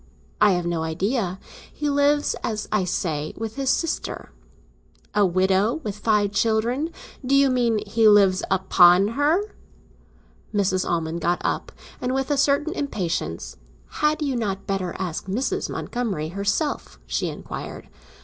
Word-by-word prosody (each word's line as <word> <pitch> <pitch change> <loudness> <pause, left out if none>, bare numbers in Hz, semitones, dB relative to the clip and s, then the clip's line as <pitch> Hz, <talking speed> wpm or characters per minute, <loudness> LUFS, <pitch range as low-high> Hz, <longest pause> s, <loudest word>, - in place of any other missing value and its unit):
"I 210 -2 +6
have 175 -1 -1
no 170 -1 -1
idea. 185 +4 -1 0.3
He 295 - -3
lives, 285 +1 +2
as 215 -2 -3
I 210 -3 +1
say, 155 -4 -2
with 220 0 -5
his 270 -1 -1
sister." 330 +3 -2 0.8
"A 205 -2 +4
widow, 190 +6 +2
with 210 -4 -3
five 210 -2 +2
children? 230 +9 +1 0.3
Do 265 +2 +2
you 275 -1 +5
mean 235 -4 +1
he 220 +2 +3
lives 200 -3 +5
upon 190 0 +5
her?" 310 - +1 1.0
Mrs. 190 -3 0
Almond 165 0 -1
got 175 +2 +1
up, - - -1 0.3
and 255 +1 -1
with 270 +2 -1
a 290 - +2
certain 285 +3 +2
impatience: 175 - -3 0.3
"Had 305 +1 0
you 275 -3 -1
not 200 -5 -2
better 190 -2 -2
ask 180 -1 -4
Mrs. 240 +8 -1
Montgomery 200 -11 -3
herself?" 200 - -2
she - - -1
inquired. - - -7
210 Hz, 140 wpm, -23 LUFS, 185-265 Hz, 1.0 s, I